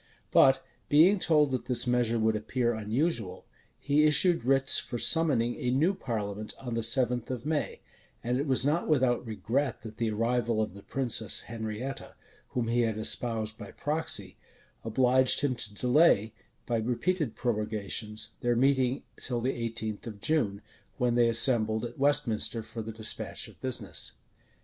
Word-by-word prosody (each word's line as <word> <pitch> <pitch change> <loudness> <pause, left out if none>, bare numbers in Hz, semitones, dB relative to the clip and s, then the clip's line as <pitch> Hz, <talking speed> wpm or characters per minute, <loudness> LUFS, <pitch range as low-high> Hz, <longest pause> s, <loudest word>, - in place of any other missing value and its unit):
But 135 0 +4 0.2
being 175 +7 +5
told 150 -5 +2
that 130 -2 -3
this 125 -1 +1
measure 120 -2 +1
would 110 0 +1
appear 120 +3 -1
unusual, 110 - -2 0.3
he 145 +2 +2
issued 165 +1 +3
writs 135 +1 +4
for 120 - -5
summoning 130 -5 +2
a 125 - -2
new 150 +10 +2
parliament 105 - -5
on 125 -3 -6
the 115 - -1
seventh 120 +1 +2
of 130 0 -5
May; 155 -1 -2 0.4
and 125 +2 -1
it 145 - -2
was 130 -1 +4
not 155 +4 0
without 130 -6 +2
regret 120 +2 -2
that 110 -1 -10
the 115 -1 -1
arrival 115 +1 0
of 110 -3 -2
the 100 - -12
princess 120 -3 +1
Henrietta, 115 +3 -6 0.3
whom 120 -2 -2
he 120 +1 +1
had 110 -2 -1
espoused 110 0 -1
by 105 -2 -9
proxy, 145 - -1 0.5
obliged 130 +3 +2
him 140 -2 +1
to 115 -4 -4
delay, 125 -4 +3 0.3
by 120 - -1
repeated 125 +5 -1
prorogations, 105 -2 -2
their 120 0 0
meeting 130 +1 +1 0.2
till 120 -2 -3
the 130 +3 -1
eighteenth 115 -2 -4
of 105 -3 -8
June, 105 -7 -1 0.3
when 125 -1 +1
they 120 -1 +3
assembled 115 -2 +3
at 120 +2 -9
Westminster 120 -5 +2
for 115 +1 -7
the 110 +1 -6
despatch 110 0 -4
of - - -18
business. - - -2
120 Hz, 160 wpm, -28 LUFS, 110-135 Hz, 0.5 s, being